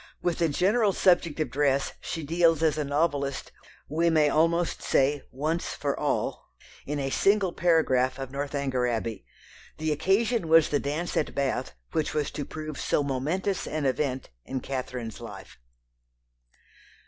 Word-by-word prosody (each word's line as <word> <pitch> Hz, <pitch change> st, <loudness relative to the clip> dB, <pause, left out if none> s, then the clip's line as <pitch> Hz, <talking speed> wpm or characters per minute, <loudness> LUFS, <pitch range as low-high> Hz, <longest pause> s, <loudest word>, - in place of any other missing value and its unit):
With 175 Hz, -1 st, 0 dB
the 165 Hz, -1 st, +2 dB
general 200 Hz, +7 st, +2 dB
subject 175 Hz, -5 st, +3 dB
of 130 Hz, -, -2 dB
dress 140 Hz, 0 st, +1 dB
she 165 Hz, -3 st, -4 dB
deals 165 Hz, +1 st, +3 dB
as 155 Hz, -2 st, +3 dB
a 155 Hz, -, -1 dB
novelist, 140 Hz, -1 st, -1 dB, 0.4 s
we 165 Hz, +3 st, +1 dB
may 155 Hz, -2 st, +4 dB
almost 165 Hz, +3 st, +1 dB
say 140 Hz, +1 st, +2 dB
once 155 Hz, +6 st, -2 dB
for -, -, -1 dB
all, -, -, -2 dB, 0.4 s
in 150 Hz, +1 st, -2 dB
a 135 Hz, -1 st, -2 dB
single 195 Hz, 0 st, +2 dB
paragraph 130 Hz, -7 st, +2 dB
of 135 Hz, -1 st, -6 dB
Northanger 140 Hz, -2 st, -1 dB
Abbey. 115 Hz, -3 st, -3 dB, 0.5 s
The 155 Hz, 0 st, -1 dB
occasion 195 Hz, +6 st, +1 dB
was 160 Hz, 0 st, +6 dB
the 145 Hz, -, +1 dB
dance 155 Hz, +5 st, -3 dB
at 150 Hz, -, -1 dB
Bath 140 Hz, -1 st, -1 dB, 0.2 s
which 155 Hz, -1 st, -1 dB
was 150 Hz, -2 st, 0 dB
to 145 Hz, -, -4 dB
prove 155 Hz, -3 st, -6 dB
so 145 Hz, -, +1 dB
momentous 155 Hz, +9 st, -1 dB
an 155 Hz, -2 st, -2 dB
event 130 Hz, -, -1 dB
in 130 Hz, -, -4 dB
Catherine's 125 Hz, -4 st, -5 dB
life. -, -, -10 dB
150 Hz, 150 wpm, -27 LUFS, 135-165 Hz, 0.5 s, was